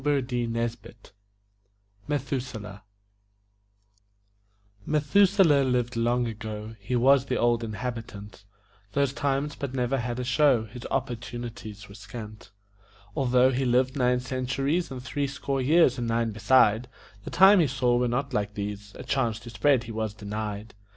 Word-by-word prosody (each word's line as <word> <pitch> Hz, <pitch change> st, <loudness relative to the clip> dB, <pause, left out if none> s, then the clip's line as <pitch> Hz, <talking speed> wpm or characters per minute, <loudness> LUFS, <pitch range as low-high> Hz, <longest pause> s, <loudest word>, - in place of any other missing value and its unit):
METHUSELAH 125 Hz, -8 st, -4 dB, 2.1 s
Methuselah 155 Hz, 0 st, +4 dB
lived 125 Hz, -1 st, 0 dB
long 120 Hz, +1 st, +1 dB
ago 110 Hz, 0 st, -6 dB
He 125 Hz, +5 st, -3 dB
was 130 Hz, +2 st, +4 dB
the 125 Hz, -, 0 dB
Old 120 Hz, 0 st, +2 dB
Inhabitant 110 Hz, -3 st, -6 dB, 0.5 s
Those 140 Hz, -1 st, +1 dB
times, 140 Hz, +3 st, -1 dB
but 135 Hz, -2 st, -5 dB
never 130 Hz, +1 st, 0 dB
had 120 Hz, +1 st, -3 dB
a -, -, -2 dB
show; 125 Hz, -1 st, +3 dB
His 120 Hz, +3 st, -9 dB
opportunities 120 Hz, -4 st, -5 dB
were 100 Hz, -, -13 dB
scant. 105 Hz, 0 st, -10 dB, 0.7 s
Although 130 Hz, -1 st, +3 dB
he 130 Hz, +1 st, -1 dB
lived 130 Hz, +2 st, +2 dB
nine 125 Hz, -2 st, +2 dB
centuries 135 Hz, +6 st, -1 dB
And 130 Hz, -2 st, -7 dB
three 140 Hz, +2 st, -2 dB
score 135 Hz, 0 st, -3 dB
years 140 Hz, -2 st, +4 dB
and 120 Hz, -, -2 dB
nine 115 Hz, 0 st, 0 dB
beside, 110 Hz, +2 st, +3 dB, 0.4 s
The -, -, -6 dB
times 190 Hz, +1 st, +7 dB
he 155 Hz, -, +3 dB
saw 125 Hz, -2 st, +1 dB
were 125 Hz, 0 st, +2 dB
not 135 Hz, +3 st, -2 dB
like 105 Hz, -2 st, -2 dB
these, 100 Hz, 0 st, -6 dB
A -, -, -8 dB
chance 120 Hz, -5 st, -1 dB
to 120 Hz, -, -10 dB
spread 125 Hz, +4 st, +2 dB
he 115 Hz, -, -8 dB
was 110 Hz, -1 st, -3 dB
denied. 105 Hz, 0 st, -5 dB
125 Hz, 135 wpm, -26 LUFS, 110-135 Hz, 2.1 s, times